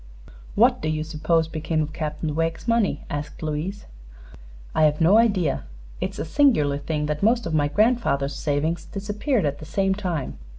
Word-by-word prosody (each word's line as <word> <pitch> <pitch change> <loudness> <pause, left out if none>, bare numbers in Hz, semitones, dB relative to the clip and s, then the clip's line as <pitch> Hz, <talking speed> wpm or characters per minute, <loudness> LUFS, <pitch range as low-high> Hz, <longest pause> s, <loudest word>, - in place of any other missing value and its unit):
"What - - +4
do 155 - -1
you 155 0 -1
suppose 160 +1 0
became 155 0 -1
of 155 +1 -6
Captain 150 -1 -3
Wegg's 165 +5 -2
money?" 230 -9 +1
asked 145 +2 -5
Louise. 155 +6 -3 0.9
"I've 150 -1 +3
no 180 +7 +6
idea. 185 - +1 0.3
It - - -1
is - - -12
a - - -3
singular 160 - +3
thing 150 0 -2
that 150 0 -2
most 230 +3 +3
of 165 - -3
my 145 -2 +3
grandfather's 150 - +1
savings 155 +3 -1
disappeared 205 - -1
at 145 0 -2
the 155 - -9
same 195 +5 +1
time. 175 - -3
160 Hz, 170 wpm, -24 LUFS, 150-195 Hz, 0.9 s, no